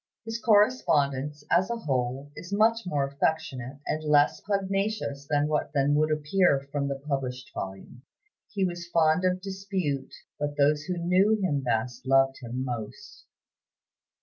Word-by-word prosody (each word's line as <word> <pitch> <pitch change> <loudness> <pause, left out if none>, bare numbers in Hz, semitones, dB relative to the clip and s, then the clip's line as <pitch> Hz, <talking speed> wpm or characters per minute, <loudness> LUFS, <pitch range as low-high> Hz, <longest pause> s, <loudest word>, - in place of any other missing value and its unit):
His 225 0 -4
correspondence, 150 - +2
as 185 +4 +3
a 235 - -1
whole, 135 - -2
is 180 - -9
much 220 +1 +2
more 145 -5 0
affectionate, 135 -2 -2
and 155 - -2
less 150 -1 +3
pugnacious 195 -7 -2
than 145 -1 +2
would 150 0 +1
appear 155 0 +2
from 140 -1 -1
the 140 - -2
published 130 -3 -3
volume. 95 +5 -7 0.5
He 195 -3 0
was 175 -1 -4
fond 165 +1 +3
of 185 0 +1
dispute, 190 -8 -3 0.3
but 145 0 -3
those 145 +1 +3
who 180 +1 -3
knew 185 +5 +3
him 155 -8 0
best 120 +1 -2
loved 135 0 +4
him 125 +2 -4
most. 120 -4 -7
150 Hz, 140 wpm, -27 LUFS, 135-185 Hz, 0.5 s, loved